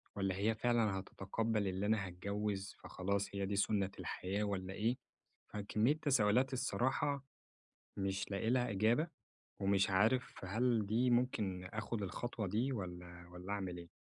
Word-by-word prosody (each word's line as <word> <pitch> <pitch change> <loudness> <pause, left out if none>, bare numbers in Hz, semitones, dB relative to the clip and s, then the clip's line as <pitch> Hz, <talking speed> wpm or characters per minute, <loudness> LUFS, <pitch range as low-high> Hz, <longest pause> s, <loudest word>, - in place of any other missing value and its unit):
والّا 95 -2 0
هي 105 +4 +2
فعلًا 110 -4 +2
هتتقبل 105 +2 -1
إن 95 +1 -1
أنا 105 -2 +2
هاتجوز 100 +2 -3
فخلاص 100 +2 -1
هي 100 0 0
دي 100 +1 -1
سُنّة 100 -1 +2
الحياة 100 +3 -2
والّا 95 -2 -2
إيه؟ 115 +5 +1 0.6
فكمية 105 +4 +2
تساؤلات 130 -2 +4
الصراحة 130 +2 0 0.7
مش 95 0 -1
لاقي 105 +3 0
لها 125 -1 +2
إجابة، 115 - +3 0.5
ومش 95 0 +3
عارف 110 +3 +2
هل 115 +2 +2
دي 120 +5 +3
ممكن 110 -7 +1
أخد 105 +2 -3
الخطوة 110 +2 -3
دي 115 +8 +1
والّا 90 -4 -6
والّا 90 +3 -5
أعمل 95 -3 -3
إيه؟ 85 -1 -9
105 Hz, 140 wpm, -37 LUFS, 95-115 Hz, 0.7 s, تساؤلات